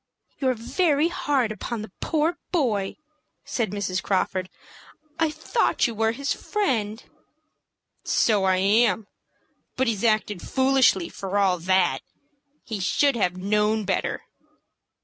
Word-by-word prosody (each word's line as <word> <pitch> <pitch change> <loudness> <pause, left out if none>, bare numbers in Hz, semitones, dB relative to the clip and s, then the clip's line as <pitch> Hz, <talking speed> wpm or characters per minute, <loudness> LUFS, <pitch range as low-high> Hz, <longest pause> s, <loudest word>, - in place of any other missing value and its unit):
"You're 260 -2 +1
very 300 - +1
hard 270 -9 0
upon 215 +1 -5
the 215 - -10
poor 325 +2 0
boy!" 220 - 0 0.5
said 230 -5 -1
Mrs. 190 -2 -2
Crawford. 185 -1 -1 0.7
"I 325 -1 +3
thought 310 +10 0
you 235 - -1
were 225 +1 +1
his 280 +4 -2
friend." 230 - -2 1.0
"So 210 -4 +2
I 190 0 +3
am; 210 +2 +3 0.7
but 260 - +1
he's 225 -4 -1
acted 215 -4 +1
foolishly 260 -9 +3
for 195 +1 -4
all 190 -3 +2
that. 185 +1 +2 0.6
He 220 -3 -5
should 275 +8 +2
have 180 -5 0
known 210 +2 +1
better." 190 - -1
220 Hz, 125 wpm, -24 LUFS, 195-265 Hz, 1.0 s, I